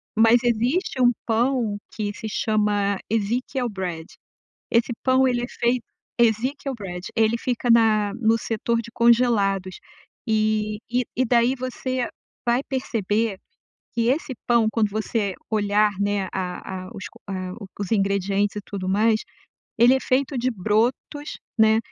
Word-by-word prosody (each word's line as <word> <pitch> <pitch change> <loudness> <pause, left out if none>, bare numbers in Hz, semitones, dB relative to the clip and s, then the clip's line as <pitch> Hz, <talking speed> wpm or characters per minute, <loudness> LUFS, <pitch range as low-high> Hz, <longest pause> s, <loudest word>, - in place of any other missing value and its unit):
Mas 225 +2 +6
existe 245 - 0
um 245 0 +6
pão 230 -2 +1 0.2
que 210 -2 -2
se 220 - -6
chama 205 -2 +1
Ezekiel 240 +4 -1
Bread 180 -5 -4 0.7
esse 235 +1 +2
pão 260 0 +4
ele 240 -1 0
é - - -2
feito 240 0 0 0.3
Ezekiel 255 +4 +1
Bread 180 -3 -7
ele 225 0 +3
fica 245 0 -1
na 215 -3 +4
no 225 -1 +2
setor 230 +1 -1
de 235 - -11
congelados. 220 -6 +3 0.5
E 215 -1 +1
e 250 +1 +1
e 255 - +3
daí 240 +1 +3
você 255 -1 -3 0.4
vai 240 +3 +2
perceber 225 -5 -1 0.6
que 235 - 0
esse 270 +2 0
pão, 235 -2 +4
quando 220 -2 +2
você 210 -1 -1 0.2
olhar, 210 0 +3
né, 200 -1 0
a 185 0 -4
a - - -10
os 200 -2 -7 0.2
a 185 -2 -4 0.3
os 200 -3 -4
ingredientes 200 0 +1
e 205 - -3
tudo 190 -2 -5
mais, 215 +3 +3 0.6
ele 240 +3 +7
é 265 - +1
feito 265 +1 0
de 250 +2 +1
brotos, 230 - -1 0.3
né, 220 0 +5
225 Hz, 140 wpm, -23 LUFS, 205-245 Hz, 0.7 s, ele